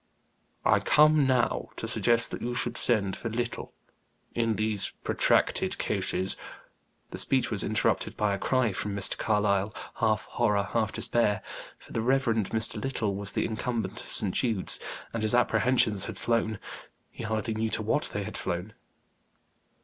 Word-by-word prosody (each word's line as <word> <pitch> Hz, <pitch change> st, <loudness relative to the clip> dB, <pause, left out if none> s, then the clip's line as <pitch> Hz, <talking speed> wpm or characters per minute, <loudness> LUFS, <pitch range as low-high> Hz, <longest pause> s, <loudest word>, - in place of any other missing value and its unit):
"I -, -, +5 dB
come 150 Hz, -2 st, +5 dB
now 130 Hz, -2 st, +1 dB
to -, -, -5 dB
suggest 115 Hz, -1 st, +3 dB
that -, -, -5 dB
you 120 Hz, +1 st, -3 dB
should -, -, -2 dB
send 100 Hz, -5 st, +2 dB
for 115 Hz, -, -5 dB
Little. 120 Hz, +1 st, -4 dB, 0.6 s
In 115 Hz, -2 st, +1 dB
these 110 Hz, -2 st, -1 dB
protracted -, -, +1 dB
cases 95 Hz, +1 st, 0 dB, 0.4 s
" -, -, -43 dB
The -, -, -5 dB
speech 130 Hz, -3 st, +1 dB
was 105 Hz, -4 st, +1 dB
interrupted 110 Hz, -, 0 dB
by 105 Hz, -1 st, +1 dB
a 100 Hz, -, -3 dB
cry 130 Hz, -1 st, +1 dB
from 100 Hz, +1 st, -3 dB
Mr. 100 Hz, -1 st, +1 dB
Carlyle, 105 Hz, -1 st, +1 dB, 0.2 s
half 110 Hz, -1 st, +1 dB
horror, 105 Hz, -4 st, +1 dB
half 110 Hz, +2 st, -1 dB
despair. 110 Hz, -2 st, +1 dB, 0.3 s
For -, -, -14 dB
the 115 Hz, -, 0 dB
Rev. 135 Hz, +3 st, +2 dB
Mr. 110 Hz, -1 st, 0 dB
Little 120 Hz, -6 st, -1 dB
was 100 Hz, 0 st, -5 dB
the -, -, 0 dB
incumbent 110 Hz, -2 st, -3 dB
of -, -, -11 dB
St. 95 Hz, -3 st, +3 dB
Jude's, 110 Hz, -7 st, +1 dB, 0.3 s
and 115 Hz, -, -2 dB
his 110 Hz, +2 st, +2 dB
apprehensions 115 Hz, -3 st, +3 dB
had -, -, -6 dB
flown 115 Hz, -2 st, 0 dB, 0.5 s
he -, -, -8 dB
hardly 110 Hz, +1 st, -2 dB
knew 110 Hz, +1 st, -1 dB
to 110 Hz, -, 0 dB
what 115 Hz, +8 st, +1 dB
they 105 Hz, -, -3 dB
had -, -, -6 dB
flown. 90 Hz, +4 st, -3 dB
110 Hz, 165 wpm, -28 LUFS, 105-120 Hz, 0.6 s, I